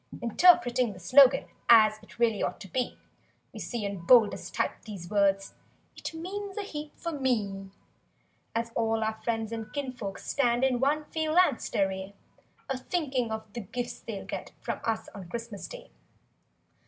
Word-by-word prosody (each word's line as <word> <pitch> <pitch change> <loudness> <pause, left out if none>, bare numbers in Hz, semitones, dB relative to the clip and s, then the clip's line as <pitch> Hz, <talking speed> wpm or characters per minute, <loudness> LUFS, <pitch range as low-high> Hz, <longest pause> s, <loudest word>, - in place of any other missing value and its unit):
N - - -9
Interpreting 250 - +5
the 185 - -12
slogan 265 +8 +6 0.2
as 215 -2 +7
It 215 - -17
really 230 -3 +2
ought - - -2
to 195 - -8
be. 250 +5 -2 0.6
We - - -8
see 235 -4 -3
in 200 -1 -3
boldest 225 +1 +4
type, - - -1
these 195 -6 -9
words— 195 -1 +2 0.4
"It - - -5
means 390 +4 -5
a 415 - -1
heap 300 -5 -7
for 335 - -4
me;" 215 -9 -1 0.9
As 230 0 -1
all 225 -1 +1
our 220 0 -3
friends 225 -1 -1
and 220 -2 -5
kinfolks 255 -8 -5
stand 245 -2 +2
In 255 -2 +2
one 295 +3 +1
phalanxed 315 -2 +2
array, 195 0 -1 0.5
A 270 -3 -2
thinking 265 -7 -1
of 220 0 -3
the 240 - -4
gifts 240 +5 -5
they'll 210 -4 -6
get - - -6
From - - -4
us 225 -1 -1
on 185 -4 -9
Christmas 230 -2 -6
Day. - - -11
235 Hz, 165 wpm, -29 LUFS, 210-270 Hz, 0.9 s, as